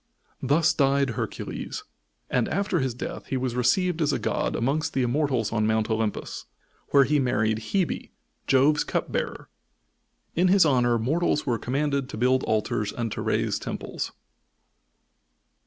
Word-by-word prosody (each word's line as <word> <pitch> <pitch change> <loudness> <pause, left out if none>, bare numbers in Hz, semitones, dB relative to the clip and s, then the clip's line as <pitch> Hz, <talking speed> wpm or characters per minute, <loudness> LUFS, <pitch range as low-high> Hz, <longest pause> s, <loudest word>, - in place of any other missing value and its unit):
Thus 150 +5 +3
died 140 -2 +2
Hercules, - - -5 0.4
and 125 -2 +1
after 195 -1 0
his 130 -3 -1
death - - -6
he 135 - -1
was 125 -2 -2
received 160 +8 +2
as 150 - +2
a - - 0
god - - -1
amongst 150 +6 0
the 130 - +2
Immortals 125 -3 0
on 110 -1 +1
Mount 110 0 +1
Olympus, 110 -1 -2 0.4
where 140 -1 +6
he 145 +3 +2
married 110 -4 +1
Hebe, 190 -4 0 0.4
Jove's 140 +3 +4
cupbearer. - - -3 0.9
In 180 +3 +3
his 185 -1 +5
honor 120 -4 +3
mortals 150 +7 0
were 120 -4 0
commanded 140 +1 -1
to - - -6
build 130 +3 +2
altars 105 -1 0
and 115 -2 -3
to - - -4
raise - - 0
temples. - - -5
130 Hz, 145 wpm, -26 LUFS, 120-150 Hz, 0.9 s, where